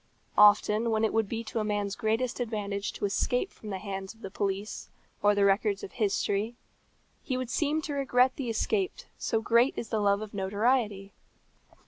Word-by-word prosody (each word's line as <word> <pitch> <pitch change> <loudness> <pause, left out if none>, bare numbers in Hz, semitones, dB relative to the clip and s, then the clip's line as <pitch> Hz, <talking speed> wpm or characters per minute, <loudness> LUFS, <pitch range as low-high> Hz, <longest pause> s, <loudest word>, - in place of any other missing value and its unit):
Often 210 +2 +5
when 220 0 +1
it 220 - -1
would 225 -3 +1
be 230 0 -3
to 225 +1 -3
a - - 0
man's 205 -1 -1
greatest 230 +3 -1
advantage 210 -4 -2
to - - -3
escape 245 - 0
from 215 - -11
the 195 - -3
hands 195 +1 -6
of 225 - -23
the 195 - -7
police 200 +1 -3 0.3
or 205 0 +4
the 200 0 +3
records 200 0 +2
of - - -6
history, 205 +2 0 0.7
he 255 - -2
would 255 -1 -4
seem 310 +1 0
to 295 - -3
regret 260 -2 +2
the 260 -4 -4
escape 380 - 0 0.3
so 225 - 0
great 235 +4 +3
is 225 - -4
the 220 - 0
love 200 0 +2
of 215 - -9
notoriety. 205 0 0
215 Hz, 185 wpm, -29 LUFS, 200-240 Hz, 0.7 s, Often